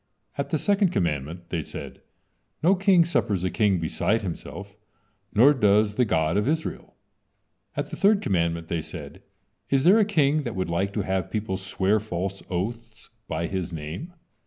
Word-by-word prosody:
At - - -3
the - - +1
second 200 -1 +2
commandment 85 - -2
they 85 -2 -1
said: - - -8 0.6
"No 180 +4 +6
king 190 -3 +4
suffers 105 - 0
a 95 - 0
king 100 0 +2
beside 105 +7 0
himself, 100 +2 -7 0.6
nor 130 +8 +6
does 105 -4 +3
the 125 +3 +2
God 80 -3 +1
of 105 - +1
Israel." 160 +2 -3 0.8
At - - -2
the - - -4
third 205 0 +4
commandment 85 - 0
they 85 -1 -1
said: - - -9 0.5
"Is 135 -1 +2
there 190 +7 +6
a - - +6
king 155 -7 +2
that 120 -5 -5
would 95 -2 -2
like 95 +4 0
to 105 - 0
have 95 -2 -1
people 105 -3 -2
swear 95 +2 0
false 95 -1 -4
oaths 115 +5 -5 0.2
by 80 +1 -2
his 90 -1 -3
name?" 80 - -6
100 Hz, 170 wpm, -25 LUFS, 85-140 Hz, 0.8 s, No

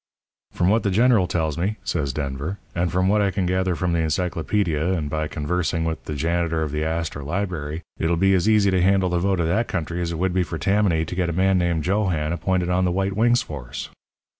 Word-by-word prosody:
"'From 90 - +1
what 110 +3 +3
the 100 - 0
General 110 -1 +4
tells 80 -3 -1
me,' 100 +5 0
says 70 -5 -1
Denver, 70 +6 -4 0.2
'and 85 0 0
from 90 +1 +1
what 105 +2 +3
I 100 - +2
can 95 -1 -1
gather 95 0 0
from 85 +2 -1
the 85 - +1
encyclopædia 85 +1 0
and 75 -3 -4
by 80 0 -1
conversing 85 +2 -1
with 80 -1 -3
the 75 - -4
janitor 80 +1 0
of 75 - -3
the 75 +1 -1
Astor 80 -2 -3
Library, 80 -2 -3 0.2
it'll 80 +2 +1
be 95 +2 +3
as 95 +3 +2
easy 105 -3 +4
to 95 -1 +2
handle 95 0 +3
the 90 0 +1
vote 95 0 +1
of 85 - +1
that 110 +8 +1
country 85 0 -3
as 85 -1 -2
it 85 - -3
would 90 +1 0
be 95 - +2
for 85 -1 -3
Tammany 95 -4 +2
to 85 - -6
get 90 -2 0
a - - -2
man 95 +2 +2
named 85 -3 0
Geoghan 90 -5 0
appointed 90 +1 0
on 90 +1 +2
the 90 - +1
White 95 +2 0
Wings 120 +4 +3
force.' 70 -6 -7
90 Hz, 235 wpm, -23 LUFS, 80-95 Hz, 0.2 s, General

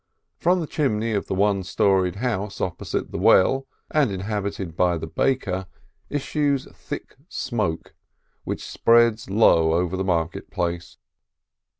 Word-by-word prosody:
From 180 +2 +3
the - - -2
chimney 115 -8 0
of 100 -2 -1
the - - -2
one 100 0 +2
storied 95 -1 +1
house 105 -3 -2
opposite 85 -2 -3
the - - -4
well 135 +8 +4 0.2
and 150 -5 +3
inhabited 100 -3 -4
by 90 -1 +2
the 80 - -5
baker, 95 +1 -1 0.4
issues 145 -1 0
thick - - -8
smoke, 105 - -3 0.5
which - - -4
spreads 115 -2 +3
low 85 -6 +4
over 90 +2 0
the 95 - -1
market 85 -3 -1
place. 85 0 -3
100 Hz, 130 wpm, -23 LUFS, 90-120 Hz, 0.5 s, well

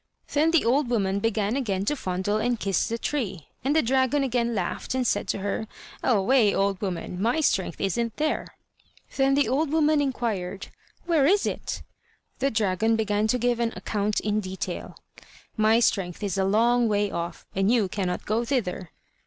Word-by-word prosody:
Then 305 +2 +3
the 330 -7 +3
old 255 +2 +2
woman 200 -4 +1
began 215 0 0
again 200 -8 -1
to 295 - +1
fondle 190 -2 -1
and 240 +1 0
kiss 195 -3 0
the 230 - -2
tree, 215 - -3
and 280 +4 +1
the 315 - +4
dragon 260 +3 +2
again 235 -2 0
laughed, 190 +6 -3
and 255 -1 0
said - - 0
to - - -1
her: 200 +2 -3 0.3
"Away, 225 -1 +3
old 195 -1 0
woman! 180 -2 -4
my 235 +8 +2
strength 190 - 0
isn't 230 +4 -1
there." 305 0 -1 0.7
Then 270 0 +3
the 285 -3 +3
old 280 +6 +1
woman 310 -1 +3
inquired: 220 -9 -3 0.4
"Where 320 -5 +3
is 400 +4 +3
it?" - - -4 0.6
The 275 - +2
dragon 220 0 +1
began 215 -1 +1
to 250 - +2
give 245 0 0
an 235 -1 0
account 210 0 -1
in 210 0 0
detail: 190 -2 -5 0.6
"My 220 +1 +4
strength 195 -5 0
is 200 -2 -1
a 190 -1 +1
long 235 +4 +3
way 205 -1 +1
off, 170 0 -5
and 195 +3 +2
you 230 -5 +3
cannot 180 -1 -3
go 220 +3 0
thither. 195 - -2
225 Hz, 180 wpm, -26 LUFS, 195-260 Hz, 0.7 s, the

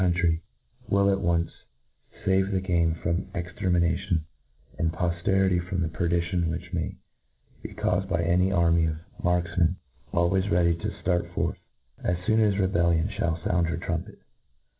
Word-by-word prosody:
county, 85 -2 +2 0.5
will 100 0 +4
at 95 0 0
once 85 -1 +1 0.7
fave 95 0 +2
the 95 - +1
game 85 -3 +1
from 85 +1 0
exter 90 +2 -3
mination, 85 0 +1 0.6
and 80 -1 +1
pofterity 90 +2 +1
from 90 -3 0
the - - 0
perdition 85 +1 0
which 90 +2 -5
may 85 -2 -2 0.7
be - - -6
caufed 95 +1 0
by 95 - +1
an 90 +3 +2
army 85 -2 +3
of 80 - -1 0.3
markfmcn, 90 0 +2 0.4
al 85 0 +3
ways 95 +1 +1
ready 85 -1 +3
to 85 - -3
ftart 85 -1 0
forth, - - -1 0.4
as 90 - +1
foon 110 +1 +3
as 105 -3 +3
rebellion 85 -2 +2
ihall 85 -6 -2
found 85 -2 +1
her 85 - -2
trumpet. - - -4
85 Hz, 155 wpm, -27 LUFS, 85-95 Hz, 0.7 s, will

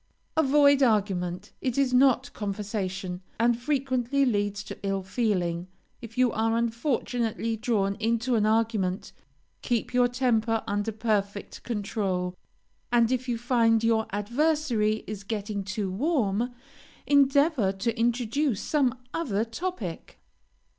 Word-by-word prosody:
Avoid 285 -2 +5
argument; 195 -5 +1
it 255 -1 -1
is 270 -2 +2
not 260 0 +4
conversation, 195 -3 -4 0.2
and 235 +1 +4
frequently 265 0 0
leads 205 -3 0
to - - -9
ill 195 -1 -1
feeling. 185 -5 -1 0.3
If 230 0 -10
you 250 -2 +4
are 225 +1 +1
unfortunately 235 -1 -1
drawn 215 -4 0
into 230 +3 0
an 215 -2 +3
argument, 215 -4 0 0.5
keep 240 0 -1
your 245 0 +4
temper 235 -3 +1
under 205 +2 -1
perfect 205 -2 -2
control, 195 -5 -2 0.6
and 235 -1 +4
if 255 0 -1
you 235 - 0
find 230 -2 +2
your 225 -1 +2
adversary 235 0 0
is 205 -1 -6
getting 205 -1 -3
too 190 0 -3
warm, 240 - 0 0.5
endeavor 280 - +4
to 205 +4 -2
introduce 240 +1 0
some 260 -4 +1 0.2
other 225 -10 -1
topic. 230 - -5
225 Hz, 120 wpm, -27 LUFS, 205-250 Hz, 0.6 s, Avoid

